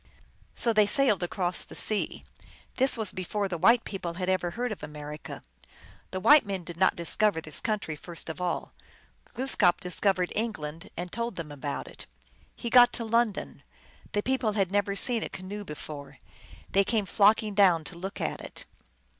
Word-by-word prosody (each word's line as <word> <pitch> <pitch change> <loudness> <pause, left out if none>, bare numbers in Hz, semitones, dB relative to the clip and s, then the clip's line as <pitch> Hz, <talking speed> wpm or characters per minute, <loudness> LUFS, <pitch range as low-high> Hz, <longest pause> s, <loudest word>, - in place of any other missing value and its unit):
So 230 - +3
they 210 -1 +5
sailed 230 -3 +2
across 175 0 -1
the - - -12
sea. 215 -1 0 0.5
This 265 -1 +4
was 220 -4 +1
before 195 +2 -2
the 175 -3 -4
white 230 +7 +5
people 180 -4 -5
had 185 +1 -2
ever 185 -2 +1
heard 245 0 -1
of 210 - -6
America. 150 0 -8 0.7
The 185 - -4
white 295 +9 +7
men 195 -3 -4
did 170 0 -8
not 185 +2 +3
discover 170 +2 +1
this 155 -2 -2
country 210 -8 -2
first 170 +2 -5
at 160 +2 -6
all. 180 -1 -2 0.6
Gloos 265 +2 +1
kap 180 -4 +3
discovered 180 0 +1
England, 165 -8 -4
and 175 +1 -5
told 235 -2 -3
them 165 -4 -6
about 145 0 -5
it. - - -10 0.5
He - - -6
got 245 -1 +8
to 230 - -4
London. 230 -2 0 0.5
The 205 - 0
people 260 -4 0
had 195 -3 0
never 200 0 +1
seen 235 +2 +3
a - - -4
canoe 200 +3 -7
before. 150 -4 -9 0.5
They 195 - +4
came 215 0 +1
flocking 210 +2 +3
down 185 -5 +4
to 170 - -10
look 190 +4 -6
at - - -2
it. - - -9
195 Hz, 180 wpm, -28 LUFS, 175-215 Hz, 0.7 s, got